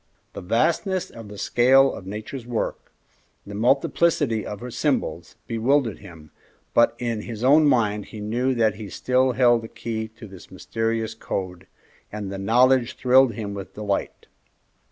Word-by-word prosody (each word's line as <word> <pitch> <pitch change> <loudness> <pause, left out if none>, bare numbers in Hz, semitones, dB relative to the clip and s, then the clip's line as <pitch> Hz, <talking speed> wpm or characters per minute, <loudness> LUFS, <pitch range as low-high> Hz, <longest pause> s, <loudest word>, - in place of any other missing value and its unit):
The - - -7
vastness 170 - 0
of 115 -2 -10
the 100 0 -10
scale 135 +5 +4
of 95 - -9
Nature's 110 +5 -7
work, 120 -2 -3 0.5
the 100 - -9
multiplicity 130 +1 +1
of 105 - -6
her 125 +2 -7
symbols, - - -2
bewildered 120 0 0
him, 85 -6 -14 0.4
but 115 0 +4
in 115 -3 -2
his 115 0 -7
own 150 +4 +6
mind 105 -6 +1
he 110 - -10
knew 120 +5 -1
that 110 -3 +1
he 105 -2 -7
still 130 +5 +1
held 120 -1 +4
the 115 - -8
key 115 -1 -5
to - - -10
this 95 -3 -13
mysterious 115 +3 -3
code, 90 -2 -5 0.4
and 105 -2 -5
the 95 - -5
knowledge 125 +4 +3
thrilled 130 -1 +4
him 105 -1 -5
with 100 0 -8
delight. 105 -2 -3
115 Hz, 155 wpm, -23 LUFS, 105-125 Hz, 0.5 s, own